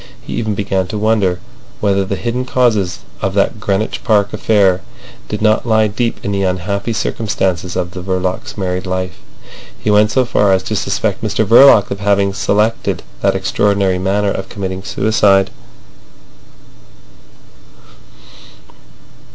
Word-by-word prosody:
He -, -, -7 dB
even 110 Hz, -2 st, -2 dB
began 95 Hz, -2 st, -1 dB
to 105 Hz, -, -5 dB
wonder 105 Hz, -4 st, +1 dB, 0.4 s
whether 100 Hz, -1 st, +1 dB
the 95 Hz, +1 st, -3 dB
hidden 120 Hz, +5 st, -2 dB
causes 115 Hz, -8 st, 0 dB, 0.2 s
of 95 Hz, 0 st, -2 dB
that 100 Hz, +2 st, +1 dB
Greenwich 105 Hz, +1 st, -2 dB
Park 105 Hz, -3 st, +2 dB
affair 100 Hz, -3 st, +2 dB, 0.5 s
did -, -, -4 dB
not 110 Hz, +2 st, +2 dB
lie 110 Hz, -1 st, +3 dB
deep 115 Hz, +3 st, -2 dB
in 100 Hz, -, -1 dB
the 100 Hz, -1 st, -1 dB
unhappy 95 Hz, +4 st, -2 dB
circumstances 95 Hz, -5 st, -2 dB
of 90 Hz, -1 st, -2 dB
the 95 Hz, -, -7 dB
Verlocs' 95 Hz, +1 st, -3 dB
married 90 Hz, -1 st, -3 dB
life. 95 Hz, 0 st, -3 dB, 0.6 s
He 105 Hz, -, 0 dB
went 105 Hz, +1 st, +4 dB
so 130 Hz, +2 st, +2 dB
far 105 Hz, -4 st, +2 dB
as 95 Hz, 0 st, +1 dB
to 110 Hz, -, -3 dB
suspect 100 Hz, +1 st, -1 dB
Mr 110 Hz, 0 st, 0 dB
Verloc 115 Hz, -1 st, +6 dB
of 100 Hz, -, -3 dB
having 100 Hz, -1 st, +1 dB
selected 105 Hz, +3 st, 0 dB, 0.2 s
that -, -, +2 dB
extraordinary 100 Hz, -2 st, +1 dB
manner 100 Hz, +2 st, 0 dB
of 95 Hz, 0 st, -5 dB
committing 95 Hz, -2 st, -5 dB
suicide. 100 Hz, -1 st, +2 dB
100 Hz, 140 wpm, -16 LUFS, 95-110 Hz, 0.6 s, Verloc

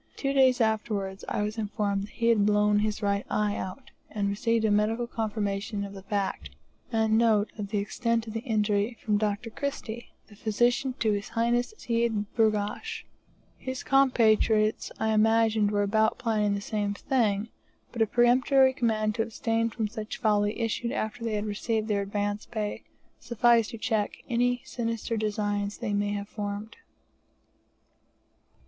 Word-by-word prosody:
Two 275 Hz, -1 st, -1 dB
days 260 Hz, -2 st, +4 dB
afterwards 210 Hz, -4 st, -1 dB
I 210 Hz, -, -1 dB
was 215 Hz, +2 st, -3 dB
informed 205 Hz, -1 st, -2 dB
he 230 Hz, 0 st, 0 dB
had 220 Hz, -3 st, +4 dB
blown 210 Hz, 0 st, +3 dB
his 210 Hz, 0 st, -1 dB
right 200 Hz, 0 st, +1 dB
eye 210 Hz, -1 st, 0 dB
out, 190 Hz, +8 st, -6 dB, 0.2 s
and 205 Hz, -2 st, -1 dB
received 225 Hz, +2 st, +1 dB
a 215 Hz, -, +2 dB
medical 215 Hz, +3 st, +1 dB
confirmation 210 Hz, -2 st, -2 dB
of 200 Hz, 0 st, -7 dB
the 195 Hz, -, -9 dB
fact, 200 Hz, 0 st, -2 dB, 0.4 s
and 220 Hz, -1 st, +2 dB
note 220 Hz, -3 st, +3 dB
of 205 Hz, -, -3 dB
the 210 Hz, -, -1 dB
extent 230 Hz, +3 st, -1 dB
of 220 Hz, -, -7 dB
the 225 Hz, -, -2 dB
injury, 215 Hz, -1 st, 0 dB
from 210 Hz, -2 st, +2 dB
Dr. 215 Hz, +2 st, -2 dB
Christie, 240 Hz, -4 st, -5 dB, 0.2 s
the 210 Hz, -, -17 dB
physician 240 Hz, +4 st, +1 dB
to 220 Hz, -2 st, +1 dB
His 205 Hz, -1 st, -2 dB
Highness 240 Hz, -, 0 dB
Seyd 230 Hz, -3 st, 0 dB
Burghash. 220 Hz, -, 0 dB, 0.5 s
His 260 Hz, 0 st, -5 dB
compatriots 225 Hz, -5 st, +3 dB
I 220 Hz, -, +1 dB
imagined 220 Hz, -1 st, +3 dB
were 205 Hz, 0 st, +1 dB
about 220 Hz, +2 st, +2 dB
planning 215 Hz, -4 st, +1 dB
the 200 Hz, -, -3 dB
same 205 Hz, -1 st, -2 dB
thing, 220 Hz, -4 st, 0 dB, 0.4 s
but 235 Hz, -, -4 dB
a 220 Hz, -, +4 dB
peremptory 255 Hz, +3 st, +4 dB
command 220 Hz, -4 st, 0 dB
to 225 Hz, -, -1 dB
abstain 225 Hz, 0 st, -1 dB
from 225 Hz, -1 st, -2 dB
such 215 Hz, 0 st, -6 dB
folly, 210 Hz, -2 st, +1 dB
issued 230 Hz, +1 st, -1 dB
after 235 Hz, -3 st, -3 dB
they 225 Hz, -2 st, -1 dB
had 210 Hz, 0 st, -2 dB
received 215 Hz, +1 st, -2 dB
their 205 Hz, -2 st, +1 dB
advance 205 Hz, +1 st, -2 dB
pay, 215 Hz, -3 st, -4 dB, 0.3 s
sufficed 235 Hz, -1 st, +3 dB
to 230 Hz, -, -7 dB
check 220 Hz, -2 st, -1 dB
any 245 Hz, 0 st, +1 dB
sinister 230 Hz, -1 st, -3 dB
designs 205 Hz, -1 st, -1 dB
they 205 Hz, -, -3 dB
may 205 Hz, 0 st, 0 dB
have 200 Hz, 0 st, -4 dB
formed. 205 Hz, +1 st, -5 dB
220 Hz, 160 wpm, -28 LUFS, 205-230 Hz, 0.5 s, days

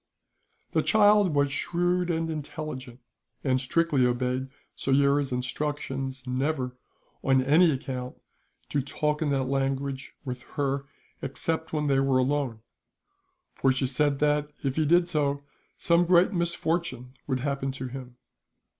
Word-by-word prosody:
The -, -, +2 dB
child 205 Hz, -5 st, +4 dB
was 140 Hz, -1 st, +2 dB
shrewd 175 Hz, +4 st, 0 dB
and 165 Hz, -1 st, 0 dB
intelligent, 150 Hz, -5 st, -6 dB, 0.4 s
and 130 Hz, -2 st, +2 dB
strictly 145 Hz, 0 st, +2 dB
obeyed 125 Hz, +2 st, 0 dB, 0.3 s
Soyera's 140 Hz, 0 st, +2 dB
instructions 135 Hz, 0 st, -3 dB
never, 130 Hz, 0 st, -1 dB, 0.5 s
on 130 Hz, -1 st, +3 dB
any 160 Hz, +6 st, +5 dB
account, 130 Hz, -3 st, -3 dB, 0.5 s
to 145 Hz, -, +1 dB
talk 150 Hz, +3 st, -1 dB
in 155 Hz, -, +1 dB
that 135 Hz, -1 st, +1 dB
language 135 Hz, 0 st, -2 dB
with 125 Hz, -1 st, -4 dB, 0.2 s
her 140 Hz, -1 st, -1 dB, 0.3 s
except 160 Hz, +4 st, -2 dB
when 150 Hz, -1 st, -1 dB
they 135 Hz, -2 st, +3 dB
were 135 Hz, -1 st, +3 dB
alone; 130 Hz, -3 st, 0 dB, 0.9 s
for 135 Hz, -, +2 dB
she 130 Hz, +1 st, 0 dB
said 140 Hz, +2 st, +1 dB
that, 150 Hz, 0 st, +1 dB
if 135 Hz, -1 st, -1 dB
he 155 Hz, -2 st, +1 dB
did 175 Hz, +2 st, +4 dB
so, 145 Hz, -4 st, 0 dB, 0.3 s
some 170 Hz, +1 st, +3 dB
great 180 Hz, +3 st, +5 dB
misfortune 170 Hz, -7 st, -1 dB
would 130 Hz, -3 st, -1 dB
happen 140 Hz, -1 st, -1 dB
to 130 Hz, 0 st, -5 dB
him. 125 Hz, -1 st, -9 dB
140 Hz, 135 wpm, -27 LUFS, 130-155 Hz, 0.9 s, any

